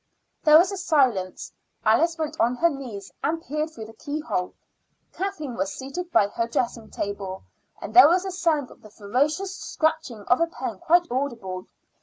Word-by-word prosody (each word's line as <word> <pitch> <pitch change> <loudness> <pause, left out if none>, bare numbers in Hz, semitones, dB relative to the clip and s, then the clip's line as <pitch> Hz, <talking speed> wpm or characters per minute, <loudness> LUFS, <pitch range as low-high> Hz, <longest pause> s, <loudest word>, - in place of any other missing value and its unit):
There 305 0 +8
was 360 +4 +4
a 395 - -4
silence. 255 - +1 0.3
Alice 325 +11 +3
went 315 -2 -4
on 240 +2 +3
her 340 +6 +3
knees 235 -9 -7
and 325 +2 0
peered 305 0 -3
through 230 -8 -9
the 220 - -12
keyhole: 285 - -3 0.6
Kathleen 360 -9 -4
was 195 -3 -2
seated 335 +7 -6
by 200 - +4
her 230 +2 -2
dressing 235 -1 -2
table, 195 -2 -5 0.4
and - - -7
there 370 - +10
was 360 +2 +2
a 380 - -3
sound 330 -7 0
of - - -17
the 215 - -14
furious 285 - -1
scratching 315 - -2
of 245 +8 +2
a 335 - +3
pen 245 - -6
quite 345 +1 +4
audible. 230 -9 -3
275 Hz, 175 wpm, -25 LUFS, 220-330 Hz, 0.6 s, there